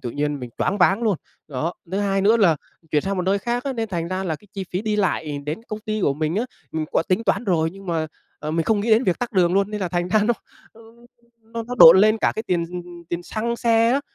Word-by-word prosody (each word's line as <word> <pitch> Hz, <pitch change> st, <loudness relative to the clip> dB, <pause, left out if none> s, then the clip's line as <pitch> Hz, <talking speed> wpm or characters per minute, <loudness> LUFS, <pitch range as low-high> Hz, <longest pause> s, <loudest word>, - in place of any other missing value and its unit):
tự 125 Hz, -3 st, -4 dB
nhiên 145 Hz, +1 st, -2 dB
mình 125 Hz, -, -7 dB
choáng 200 Hz, -, 0 dB
váng 195 Hz, +5 st, +3 dB
luôn. 210 Hz, -5 st, +2 dB, 0.3 s
Đó, 155 Hz, +4 st, -2 dB, 0.2 s
thứ 195 Hz, -, 0 dB
hai 195 Hz, -1 st, +1 dB
nữa 215 Hz, +4 st, +4 dB
là 175 Hz, -8 st, +4 dB, 0.3 s
chuyển 150 Hz, -, +2 dB
sang 195 Hz, 0 st, -2 dB
một 180 Hz, -, 0 dB
nơi 190 Hz, +2 st, +1 dB
khác 240 Hz, +5 st, -2 dB
á, 275 Hz, -, -1 dB
nên 225 Hz, -3 st, -3 dB
thành 170 Hz, -3 st, -3 dB
ra 185 Hz, +1 st, -2 dB
là 160 Hz, -4 st, -2 dB
cái 210 Hz, -, -22 dB
chi 195 Hz, -2 st, -4 dB
phí 185 Hz, +3 st, -2 dB
đi 215 Hz, -1 st, -1 dB
lại 160 Hz, -7 st, -1 dB
đến 155 Hz, +7 st, -3 dB
công 215 Hz, 0 st, -5 dB
ty 215 Hz, 0 st, -3 dB
của 140 Hz, -7 st, +2 dB
mình 155 Hz, +2 st, -1 dB
á, 230 Hz, -, +1 dB, 0.3 s
mình 160 Hz, -1 st, -1 dB
có -, -, +3 dB
tính 195 Hz, +5 st, +1 dB
toán 200 Hz, -, +1 dB
rồi, 165 Hz, -5 st, +1 dB
nhưng 195 Hz, +1 st, -13 dB
mà, 165 Hz, -2 st, -1 dB, 0.3 s
ờ, 150 Hz, -, -4 dB
mình 165 Hz, +1 st, 0 dB
không 215 Hz, -2 st, +2 dB
nghĩ 225 Hz, +2 st, -1 dB
đến 225 Hz, +4 st, +5 dB
việc 180 Hz, -, +1 dB
tắc 245 Hz, -1 st, -4 dB
đường 180 Hz, -3 st, +3 dB
luôn. 200 Hz, +1 st, +2 dB
Nên 210 Hz, -1 st, -4 dB
là 185 Hz, -, -1 dB
thành 175 Hz, 0 st, -1 dB
ra 215 Hz, +2 st, +3 dB
nó 235 Hz, +3 st, +2 dB, 0.4 s
nó 225 Hz, -, -17 dB, 0.6 s
nó 230 Hz, +1 st, -6 dB
nó 245 Hz, +2 st, -6 dB
độn 165 Hz, +3 st, +10 dB
lên 215 Hz, +2 st, +4 dB
cả -, -, +2 dB
cái 220 Hz, -, -3 dB
tiền, 175 Hz, -5 st, 0 dB
ừm, 180 Hz, 0 st, -5 dB
ừm, 175 Hz, -1 st, -12 dB
tiền 170 Hz, 0 st, -3 dB
xăng 230 Hz, +5 st, -3 dB
xe 230 Hz, -1 st, +3 dB
á, 275 Hz, -, +2 dB
195 Hz, 285 wpm, -22 LUFS, 170-220 Hz, 0.6 s, độn